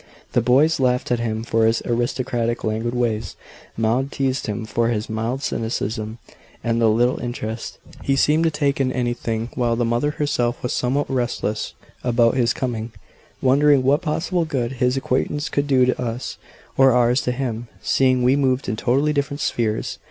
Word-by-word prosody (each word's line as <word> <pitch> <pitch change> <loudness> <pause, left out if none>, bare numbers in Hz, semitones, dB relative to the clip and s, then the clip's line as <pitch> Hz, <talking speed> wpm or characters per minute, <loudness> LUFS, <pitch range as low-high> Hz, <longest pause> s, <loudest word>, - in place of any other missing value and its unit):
The - - +2
boys 145 +6 +3
laughed 125 -1 +1
at 120 - +2
him 110 -1 -2
for 115 -1 +2
his 115 0 +1
aristocratic, 120 0 -1
languid 110 +3 -1
ways; 115 -3 -1 0.4
Maud 120 +5 +1
teased 135 -1 -1
him 110 +1 -3
for 115 +1 0
his 110 -1 -2
mild 115 +5 -2
cynicism 110 -2 -3 0.5
and 115 0 0
the 115 - +5
little 120 +4 +2
interest 115 -2 -5 0.2
he 135 - +1
seemed 150 +4 +3
to - - +4
take 140 -3 0
in 130 -1 +1
anything; 120 -2 -2
while 120 -2 +1
the 120 0 0
mother 120 +5 +1
herself 135 -5 -1
was 125 - -1
somewhat 135 +4 0
restless 120 -4 -2 0.3
about 120 -1 +3
his 120 -3 +2
coming, 115 -3 -3 0.5
wondering 140 +1 +4
what 140 +3 +3
possible 170 +2 0
good 130 -7 -2
his 125 0 0
acquaintance 140 +3 -1
could 145 0 -1
do 130 -3 +4
to 130 - 0
us, 120 +1 -4 0.4
or 135 -1 +6
ours 125 +1 +3
to 125 - -1
him, 120 -2 -3 0.2
seeing 130 -2 +3
we 125 +2 +4
moved 135 -2 +1
in 105 - -1
totally 135 +7 +1
different 140 0 -1
spheres. 110 -2 -1
125 Hz, 175 wpm, -22 LUFS, 115-135 Hz, 0.5 s, or